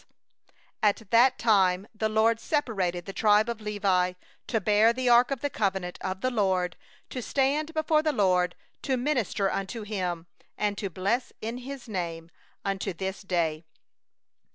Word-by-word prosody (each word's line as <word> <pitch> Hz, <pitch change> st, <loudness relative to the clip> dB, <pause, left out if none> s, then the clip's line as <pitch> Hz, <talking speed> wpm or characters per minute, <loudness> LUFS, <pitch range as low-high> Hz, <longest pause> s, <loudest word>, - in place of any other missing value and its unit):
— -, -, -34 dB, 0.3 s
8At 210 Hz, -1 st, +1 dB
that 245 Hz, +3 st, +5 dB
time 195 Hz, -3 st, +3 dB
the 220 Hz, 0 st, -1 dB
LORD 220 Hz, +1 st, +3 dB
separated 195 Hz, -, -1 dB
the 195 Hz, -, -7 dB
tribe 210 Hz, +1 st, +4 dB
of 235 Hz, -2 st, -4 dB
Levi, 195 Hz, -4 st, +1 dB, 0.3 s
to 225 Hz, -, +1 dB
bear 210 Hz, +2 st, +4 dB
the 250 Hz, +1 st, 0 dB
ark 240 Hz, +1 st, +6 dB
of 275 Hz, -3 st, -3 dB
the 285 Hz, -, 0 dB
covenant 190 Hz, -5 st, -2 dB
of 190 Hz, 0 st, -4 dB
the 255 Hz, -, 0 dB
LORD, 190 Hz, -6 st, +1 dB, 0.4 s
to 255 Hz, -, -4 dB
stand 285 Hz, +5 st, 0 dB
before 315 Hz, 0 st, +2 dB
the 310 Hz, 0 st, +1 dB
LORD 180 Hz, -7 st, +2 dB, 0.3 s
to 265 Hz, -2 st, 0 dB
minister 245 Hz, -7 st, 0 dB
unto 210 Hz, +3 st, -4 dB
Him, 180 Hz, -5 st, -3 dB, 0.3 s
and 205 Hz, -1 st, 0 dB
to 200 Hz, -, -3 dB
bless 200 Hz, +8 st, -1 dB
in 230 Hz, +3 st, -4 dB
His 265 Hz, 0 st, -8 dB
name, 170 Hz, -5 st, -4 dB, 0.3 s
unto 195 Hz, 0 st, -2 dB
this 190 Hz, +3 st, -4 dB
day. 170 Hz, -5 st, -1 dB
210 Hz, 160 wpm, -27 LUFS, 185-240 Hz, 0.4 s, ark